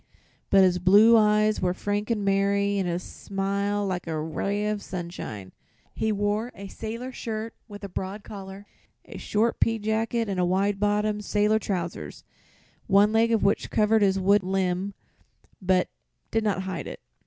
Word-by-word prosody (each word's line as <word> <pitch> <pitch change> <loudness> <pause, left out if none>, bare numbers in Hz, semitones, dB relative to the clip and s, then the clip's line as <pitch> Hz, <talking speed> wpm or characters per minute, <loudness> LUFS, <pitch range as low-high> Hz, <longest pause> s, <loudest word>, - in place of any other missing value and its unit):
But 195 -1 +6
his 180 -1 +3
blue 205 +6 +6
eyes 215 0 +3
were 180 0 0
frank 205 +2 -2
and 210 -3 0
merry 200 +1 +2
and 185 -2 -1
his 175 +1 -2
smile 200 +1 -2
like 180 -2 -3
a 160 -1 -2
ray 200 +7 -2
of 210 -1 -2
sunshine. 170 - -6 0.4
He 220 - -1
wore 205 +3 -1
a 200 0 -9
sailor 230 +5 -6
shirt 225 -2 -5
with 205 -2 -10
a - - -3
broad 195 +2 -5
collar, 195 0 -9 0.4
a - - -9
short 220 +3 0
peajacket 225 +1 0
and 180 -3 0
wide 195 +2 +1
bottomed 210 0 0
sailor 210 +1 +2
trousers, 180 -5 -4 0.6
one 205 +2 +4
leg 225 +1 +3
of 225 - +2
which 200 +1 +1
covered 215 0 +3
his 195 -1 +3
wooden 190 0 +2
limb 190 +1 -1 0.7
but 185 -1 +2 0.4
did 225 0 +1
not 195 -3 0
hide 190 -2 -5
it. - - -7
200 Hz, 160 wpm, -26 LUFS, 190-215 Hz, 0.7 s, But